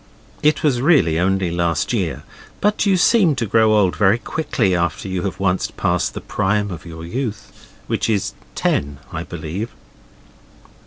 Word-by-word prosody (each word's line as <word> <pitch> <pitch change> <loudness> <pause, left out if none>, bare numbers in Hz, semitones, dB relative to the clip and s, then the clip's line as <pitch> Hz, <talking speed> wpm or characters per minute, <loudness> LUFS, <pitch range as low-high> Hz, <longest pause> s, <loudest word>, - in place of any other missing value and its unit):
It 150 +1 +2
was 130 -6 +2
really 130 - +4
only 95 -1 +1
last 85 +5 0
year, 85 - -2 0.4
but 210 0 +1
you 195 -2 +4
seem 180 -4 +4
to 120 - -1
grow 110 +1 +3
old 100 -4 +3
very 100 +1 +4
quickly 120 - -1
after 85 +2 -1
you 95 -1 -2
have 95 0 -4
once 95 -1 +1
passed - - -1
the - - -5
prime 105 +1 0
of 85 -1 -8
your 80 0 -8
youth, 115 +3 -6
which - - -1
is 105 -4 0
at - - -28
ten, 70 0 0 0.2
I - - -3
believe. 95 +9 -5
100 Hz, 165 wpm, -20 LUFS, 90-125 Hz, 0.4 s, really